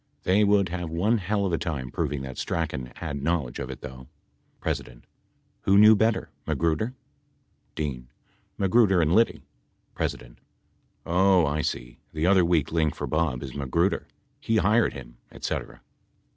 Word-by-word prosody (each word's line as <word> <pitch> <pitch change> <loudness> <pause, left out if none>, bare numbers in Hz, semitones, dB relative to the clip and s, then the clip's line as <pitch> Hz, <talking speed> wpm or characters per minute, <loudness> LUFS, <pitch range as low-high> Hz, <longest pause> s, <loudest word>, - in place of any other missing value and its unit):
They 100 +3 +3
would 100 -3 +3
have 90 -1 -4
one 100 +8 +1
hell 100 +1 -1
of 90 - -1
a 85 - +1
time 65 -7 -4
proving 70 -2 -2
that 65 -1 -7
Strachan 75 -7 -3
had 70 -1 -5
knowledge 75 -5 -1
of - - -5
it, - - -8
though. 65 -1 -9 0.6
P. - - +1 0.9
Who 100 0 +3
knew 110 +1 +8
better? 110 +2 +1 0.2
Magruder? 85 +10 0 0.8
D. 65 -5 -4 0.5
Magruder 95 -1 +4
and 80 0 +2
Liddy. 115 +3 +2 0.5
P. - - +1 1.0
Oh, 90 0 +4
I 75 +1 0
see. - - -4
The 80 +1 -1
other 95 0 +5
weak 85 -4 +1
link 80 -2 +1
for - - -4
Bob 75 -5 -1
is 65 -3 -7
Magruder, 80 +7 0 0.3
he 115 - 0
hired 110 +4 +3
him - - -11
et - - -14
cetera. - - -4
85 Hz, 155 wpm, -26 LUFS, 70-100 Hz, 1.0 s, knew